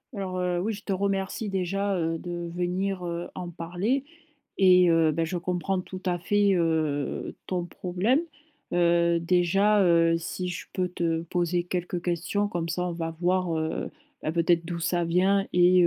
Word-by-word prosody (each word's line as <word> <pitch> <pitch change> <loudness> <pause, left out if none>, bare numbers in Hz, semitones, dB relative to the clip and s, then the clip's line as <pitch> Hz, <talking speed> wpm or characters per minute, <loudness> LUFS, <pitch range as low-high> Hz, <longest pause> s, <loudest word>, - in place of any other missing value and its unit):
Alors, 185 -2 -3
heu 180 -1 0
oui, 215 +5 -1
je 205 0 -9
te - - -4
remercie 195 +2 -1
déjà, 195 +1 -1
heu, 165 -2 -1
de 175 0 -5
venir, 180 +1 -1
heu, 170 0 -3
en 180 -1 -5
parler, 180 +11 -1 0.6
et 180 -2 +6
heu 165 -1 +4
beh, 165 +2 0
je 175 +2 -2
comprends 180 +2 -1
tout 185 +1 -9
à 180 -2 0
fait, 200 +3 +2
heu, 155 -4 -1
ton 180 -2 -1
problème. 185 - 0 0.5
Heu, 170 -1 +3
déjà, 185 +4 +3
heu, 165 -2 +4
si 180 +2 -4
je 180 - -5
peux 185 -2 0
te 165 -2 -1
poser 175 +1 0
quelques 180 0 -3
questions, 180 +4 -1
comme 170 -3 -3
ça 175 +2 -1
on 175 - -3
va 165 -1 -4
voir, 180 -2 +1
heu 160 0 -2 0.3
beh, 155 - -1
peut-être 170 0 +2
d'où 170 0 -4
ça 175 +1 0
vient 190 +4 +2
et 180 0 +6
175 Hz, 175 wpm, -27 LUFS, 170-185 Hz, 0.6 s, et